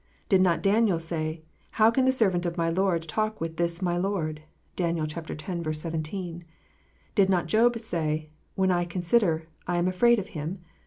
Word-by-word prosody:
Did 190 -2 +5
not 175 -3 +2
Daniel 205 -2 +3
say, 160 -1 -3 0.3
"How 220 +1 +6
can 260 +2 +2
the 260 - +5
servant 190 -8 +2
of 170 +1 -4
my 165 -1 +1
Lord 175 -2 +1
talk 215 +6 -1
with 165 0 -4
this 170 +1 -1
my 175 -1 +1
Lord 175 -5 -2 0.2
"? - - -40
(Dan. 170 -2 0
x. 155 +1 -4
17.) 165 +2 -4 0.7
Did 195 -2 +4
not 180 -2 +2
Job 235 +2 +3
say, 155 -7 -2 0.2
"When 190 -1 +2
I 175 -1 +2
consider, 175 -1 +1 0.2
I 175 0 0
am 175 +1 +2
afraid 235 +6 +4
of 200 -1 -4
Him 170 +4 -5
175 Hz, 175 wpm, -27 LUFS, 165-195 Hz, 0.7 s, How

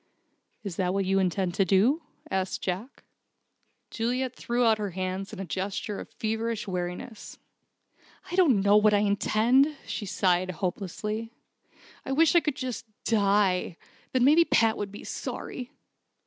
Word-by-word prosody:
"Is 195 -5 -5
that 185 0 0
what 195 -1 +1
you 195 +1 +2
intend 185 -1 0
to 195 - +2
do?" 210 - +3 0.3
asked 190 0 -2
Jack. 195 +8 -4 0.9
Juliet 250 +2 -1
threw 240 0 0
out 220 -1 +4
her 205 -1 -2
hands 185 +1 -3
in 215 - -8
a 195 - -4
gesture 195 +4 -3
of - - -8
feverish 220 0 -3
weariness. 180 +4 -5 0.9
"I - - -2
don't 295 - +4
know 205 +1 +5
what 210 0 +5
I 205 - +3
intend," 230 +8 +3
she 205 - -4
sighed, 185 -1 +1
hopelessly, 200 +5 -4 0.7
"I 270 - -3
wish 320 +3 +4
I - - +9
could 300 -4 -2
just 250 -3 -5 0.2
die. 200 -5 +2 0.3
Then 255 -1 +2
maybe 305 +6 +6
Pat 225 -8 +3
would 200 -1 -4
be 205 - -10
sorry." 250 -1 -6
210 Hz, 150 wpm, -27 LUFS, 190-240 Hz, 0.9 s, I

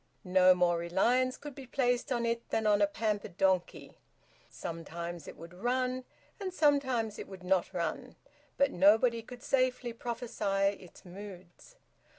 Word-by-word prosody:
No 185 0 +6
more 175 -1 +2
reliance 240 +10 +1
could 295 -1 -9
be 265 -1 -10
placed 245 -1 0
on 240 -2 0
it 235 0 -2
than 220 - 0
on 205 -1 +4
a 205 - +5
pampered 205 -3 -3
donkey. 190 -2 0 0.5
Sometimes 170 0 -6
it - - -9
would 170 +1 -11
run, 255 +5 -1 0.3
and 385 -2 -3
sometimes 260 - +1
it - - -6
would 190 -2 -11
not 185 0 +1
run, 170 -4 -3 0.4
but 280 0 +3
nobody 225 +5 +4
could 245 +2 -12
safely 255 -3 +1
prophesy 210 -4 -1
its 180 0 -15
moods. 185 - -11
210 Hz, 150 wpm, -31 LUFS, 180-250 Hz, 0.5 s, No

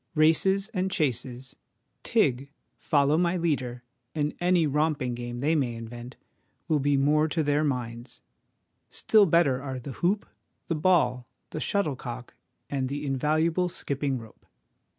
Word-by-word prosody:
Races 190 +6 +3
and 190 -4 -1
chases, 130 - -2 0.5
'tig,' 140 - +1 0.3
'follow 145 +1 +2
my 175 +1 +1
leader,' 130 -8 -1 0.3
and 150 -1 0
any 175 -2 +3
romping 150 -3 0
game 120 0 -5
they 150 +4 +2
may 130 -7 0
invent, 120 +2 -8 0.5
will 155 -2 +2
be 140 0 +2
more 150 +3 +3
to 160 0 0
their 145 +1 +2
minds: 120 -3 -4 0.7
still 215 -3 +4
better 150 -6 +3
are 135 -2 -5
the 130 +2 -7
hoop, 185 - 0 0.4
the 170 - -1
ball, 150 -7 +2 0.2
the - - -4
shuttlecock, 130 - -2 0.3
and 135 -2 -2
the 145 +2 -4
invaluable 155 +6 +1
skipping 140 -4 -2
rope. 115 -2 -13
145 Hz, 135 wpm, -27 LUFS, 125-165 Hz, 0.7 s, still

